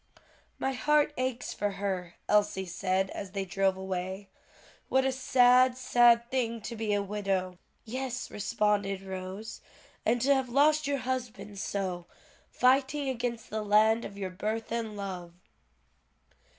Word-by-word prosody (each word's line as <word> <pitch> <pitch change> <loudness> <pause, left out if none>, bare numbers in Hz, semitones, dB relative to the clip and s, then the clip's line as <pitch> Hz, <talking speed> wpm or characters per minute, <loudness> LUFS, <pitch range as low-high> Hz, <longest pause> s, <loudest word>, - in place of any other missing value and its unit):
"My 270 - -1
heart 295 +4 +2
aches 255 -1 -2
for 205 -1 -2
her," 190 -3 -3
Elsie 205 -2 +2
said 185 +2 -1
as 195 -1 -7
they 195 -1 -2
drove 190 +1 +1
away, 190 +1 -4 0.6
"what 265 0 +3
a 265 - +2
sad, 255 -1 +4
sad 240 -2 +5
thing 235 -3 0
to 230 +3 -6
be 220 -1 -2
a 205 -1 +1
widow!" 195 -3 -2 0.3
"Yes;" 255 +2 -4
responded 205 -2 0
Rose, 190 +3 -7 0.4
"and 240 +2 +2
to 280 +3 +4
have 265 -2 0
lost 300 +3 +3
your 285 0 +1
husband 230 -6 -4
so, 185 -4 -3 0.4
fighting 270 +2 +2
against 240 -2 -3
the 215 0 -2
land 215 +2 +4
of 200 - -8
your 190 -2 -4
birth 215 +4 -3
and 225 -2 -3
love." 180 -4 -6
215 Hz, 140 wpm, -29 LUFS, 195-250 Hz, 0.6 s, sad